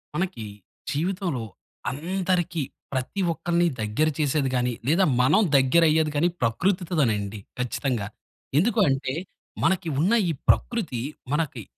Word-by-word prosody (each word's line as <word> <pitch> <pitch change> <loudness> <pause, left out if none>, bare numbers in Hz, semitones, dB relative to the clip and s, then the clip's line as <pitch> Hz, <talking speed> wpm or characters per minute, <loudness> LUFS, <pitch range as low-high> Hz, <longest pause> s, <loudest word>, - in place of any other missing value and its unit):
మనకి 175 - -2 0.5
జీవితంలో 170 - -1 0.5
అందరికీ 175 +2 -1 0.3
ప్రతి 130 +9 -2
ఒక్కల్ని 170 +1 +1
దగ్గర 110 +9 +1
చేసేది 145 -2 +1
గాని, 125 -1 +1 0.2
లేదా 170 +6 +4 0.2
మనం 130 +12 +4
దగ్గర 135 +5 +5
అయ్యేది 155 0 +2
గాని 165 +4 +3
ప్రకృతితోనండి 125 - 0 0.2
ఖచ్చితంగా. 125 -3 -1 0.5
ఎందుకు 220 +8 +3
అంటే, 135 -1 -1 0.5
మనకి 180 -3 +2
ఉన్న 185 +9 +3 0.2
ఈ - - +2 0.2
ప్రకృతి 195 - +1 0.3
మనకి 150 -6 -1
155 Hz, 110 wpm, -25 LUFS, 130-180 Hz, 0.5 s, దగ్గర